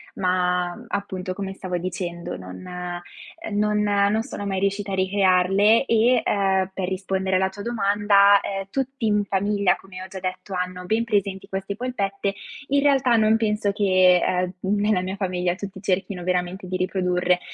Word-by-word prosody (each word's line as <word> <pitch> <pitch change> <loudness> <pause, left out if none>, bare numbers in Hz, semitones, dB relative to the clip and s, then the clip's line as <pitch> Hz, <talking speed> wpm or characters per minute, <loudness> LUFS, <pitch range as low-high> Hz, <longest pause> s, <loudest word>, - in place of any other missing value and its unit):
ma 180 -1 0
,mhmm, 240 - -12
appunto, 190 -3 -4
come 195 -1 -4
stavo 185 -2 -4
dicendo, 175 - -4
non 90 - -10
ehm, 180 -1 -5 0.6
non 210 0 +2
non 205 +1 +2
sono 215 -5 -6
mai 190 -1 -1
riuscita 200 0 -1
a - - +1
ricrearle 195 +4 +3
e, 235 +1 +3
ehm, 190 -2 +1
per 190 -1 -3
rispondere 190 0 -1
alla 190 0 +2
tua 200 +1 -9
domanda, 205 -2 +4
ehm, 195 0 -4
tutti 265 -3 -2
in 210 -1 +2
famiglia, 200 0 +1
come 185 -1 -11
ho 185 - -7
già 190 0 -8
detto, 185 +1 -5
hanno 180 0 -3
ben 220 +5 +1
presenti 200 -4 -1
queste 195 +1 -4
polpette. 200 -5 -2 0.3
In 280 0 +2
realtà 270 -4 +3
non 220 0 +4
penso 210 -2 0
che, 185 -3 +4
ehm, 180 0 0
nella 205 0 +1
mia 190 +2 -4
famiglia 180 -2 -1
tutti 195 -1 -8
cerchino 190 -1 -2
veramente 180 +1 -2
di 185 0 -2
riprodurre. 180 -1 +1
195 Hz, 170 wpm, -23 LUFS, 185-205 Hz, 0.6 s, domanda